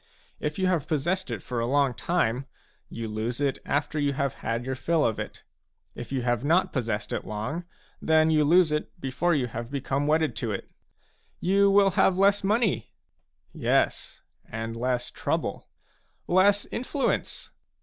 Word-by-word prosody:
If 150 0 -3
you 190 - +1
have 175 -6 +1
possessed 170 +4 -1
it 115 -5 -4
for 125 -2 -3
a 115 - 0
long 140 0 +2
time, 135 -2 0 0.4
you 115 -1 -5
lose 110 +3 -3
it 140 -2 0
after 145 +1 0
you 145 -1 +1
have 140 -1 -1
had 115 +2 -2
your 130 - -2
fill 160 +4 +1
of 110 - 0
it; - - -7 0.5
if 120 - -8
you 130 -3 -1
have 120 0 0
not 170 +6 +2
possessed 115 -5 -2
it - - -2
long, 125 +12 -4 0.4
then 160 0 +4
you 155 -1 +4
lose 165 +2 +5
it 150 +3 -3
before 165 +5 0
you 135 -4 +1
have 115 0 -6
become 140 +1 -1
wedded 155 0 +2
to 115 -3 -2
it. 100 - -5 0.4
" - - -40
You 200 +1 +5
will 195 0 +5
have 185 0 +3
less 200 +1 +4
money.,, 210 +1 +1 0.6
Yes, - - 0 0.3
and 115 +1 -4
less 125 +1 -1
trouble. - - -3 0.6
"Less 200 +3 +4
influence. 255 +3 -2
145 Hz, 170 wpm, -27 LUFS, 120-175 Hz, 0.6 s, lose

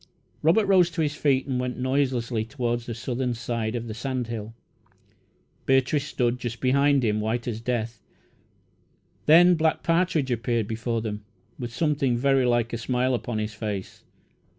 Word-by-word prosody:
Robert 200 +8 +4
rose 185 -3 +4
to 165 -1 -1
his 145 -1 -1
feet 140 -3 +1
and 130 -2 -2
went 125 0 -3
noiselessly 130 -3 0
toward 120 -1 -2
the 115 -1 -7
southern 125 +1 -2
side 115 -1 -3
of 120 0 -4
the 110 - -5
sand 125 +2 -3
hill. 115 -1 -6 1.1
Beatrice 135 +2 +2
stood 125 -1 0
just 120 -1 -5
behind 140 +1 +3
him, 105 -1 +1
white 115 +3 -2
as 115 -2 -3
death. 115 -2 -3 1.3
Then 175 +4 +7
Black 160 -2 +1
Partridge 165 -5 +1
appeared 120 -1 0
before 115 +1 -2
them, 105 -2 -4 0.4
with 120 -2 -5
something 140 -2 +1
very 135 0 +3
like 120 -1 +1
a 115 - -2
smile 125 +2 0
upon 120 -2 -2
his 110 0 -3
face. 105 -2 -5
125 Hz, 160 wpm, -25 LUFS, 115-140 Hz, 1.3 s, Then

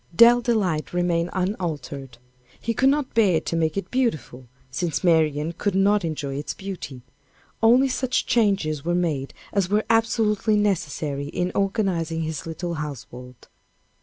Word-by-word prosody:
Dell 240 +4 +7
Delight 195 -12 0
remained 175 -1 +1
unaltered. 160 - -4 0.4
He 230 - -2
could 265 +4 +3
not 285 -1 0
bear 200 -8 +4
to - - -3
make 160 +1 0
it 195 - -4
beautiful, 190 - -1 0.3
since 170 +6 -2
Marian 160 -2 +2
could 200 +3 -2
not 200 +1 +3
enjoy 145 -4 -3
its 145 - -4
beauty. 180 -10 -7 0.6
Only 245 +4 +5
such 260 -1 0
changes 195 -10 +1
were 175 +1 0
made 155 -6 -1 0.2
as 195 -3 +1
were 210 +2 +1
absolutely 225 -1 +2
necessary 155 -8 -1
in 180 +4 -2
organizing 190 -5 0
his 160 0 -4
little 170 +1 -4
household. 125 -5 -8
175 Hz, 140 wpm, -24 LUFS, 155-210 Hz, 0.6 s, Dell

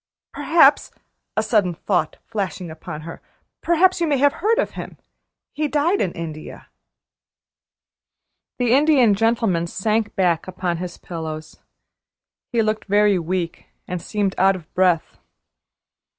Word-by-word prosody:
Perhaps," 315 -4 +4 0.5
a 220 - +2
sudden 205 -6 +1
thought 175 -3 -1
flashing 185 -4 -4
upon 155 -1 -8
her, 165 +1 -9 0.4
"perhaps 345 +2 +3
you 335 - +2
may 290 -2 +2
have 285 +1 +3
heard 445 +5 +1
of - - 0
him? - - -8 0.6
He 305 +1 -1
died 305 +7 +1
in 180 - 0
India." 160 -2 -8 1.9
The 245 -2 +1
Indian 275 -6 +5
Gentleman 220 -5 +1
sank 215 +4 -1
back 175 -3 +1
upon 180 -2 -2
his 175 0 -6
pillows. 160 -3 -7 0.9
He 235 -2 +2
looked 215 0 -1
very 205 -1 +3
weak, 170 0 -3 0.2
and 180 -1 -4
seemed 205 -1 -1
out 190 +1 +4
of 170 -4 -12
breath. 180 -3 +1
195 Hz, 130 wpm, -21 LUFS, 170-245 Hz, 1.9 s, Indian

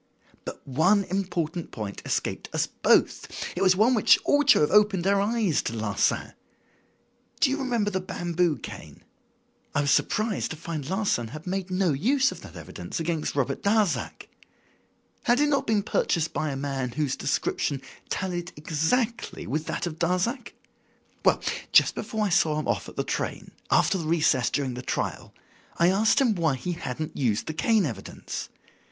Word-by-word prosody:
"But - - -8
one 180 +10 +3
important 175 -3 -2
point 105 -3 -6
escaped - - -2
us - - +1
both. - - +2 0.3
It 180 - -3
was 185 -1 +5
one 220 +6 +4
which 220 - +6
ought 290 -1 +3
to - - +7
have 150 - +2
opened 205 -3 +4
our 200 0 +3
eyes 210 -5 +1
to - - -4
Larsan. 110 -2 0 1.1
Do 270 - +4
you 275 - 0
remember 235 -6 0
the 190 - 0
bamboo 175 -3 0
cane? - - -10 0.7
I 145 - +3
was 145 0 +1
surprised 215 +5 +1
to 160 - -6
find 155 -3 -5
Larsan 190 - 0
had 155 +7 -9
made 190 0 -3
no 185 -3 +1
use 260 - +2
of - - -9
that - - -12
evidence - - -6
against 165 -2 -2
Robert 140 -1 -1
Darzac. 205 -2 0 1.0
Had 245 0 +4
it 295 0 +3
not 280 -2 +1
been 215 -2 +2
purchased 160 -4 0
by 155 - -1
a 140 - -3
man 135 -3 -3
whose 145 -2 -1
description 140 0 -1 0.3
tallied 175 -1 -3
exactly 165 - -1
with 155 +3 -3
that - - -2
of 165 -1 -5
Darzac? 185 - -1 0.7
Well, - - +3 0.3
just - - +6
before 220 -1 -2
I - - 0
saw 160 -5 +2
him - - -4
off - - -1
at - - -14
the - - -1
train, - - -4 0.2
after 190 - +3
the 160 - -4
recess 155 -6 +2
during 135 -3 -1
the 125 - -6
trial, - - -3 0.5
I 170 +1 +4
asked 220 +6 +3
him 255 -5 +3
why 165 -7 +1
he 175 +7 -4
hadn't 155 -2 -5
used 115 -6 0
the 155 - -4
cane 215 +4 +2
evidence. 110 -9 -6
175 Hz, 170 wpm, -26 LUFS, 150-210 Hz, 1.1 s, to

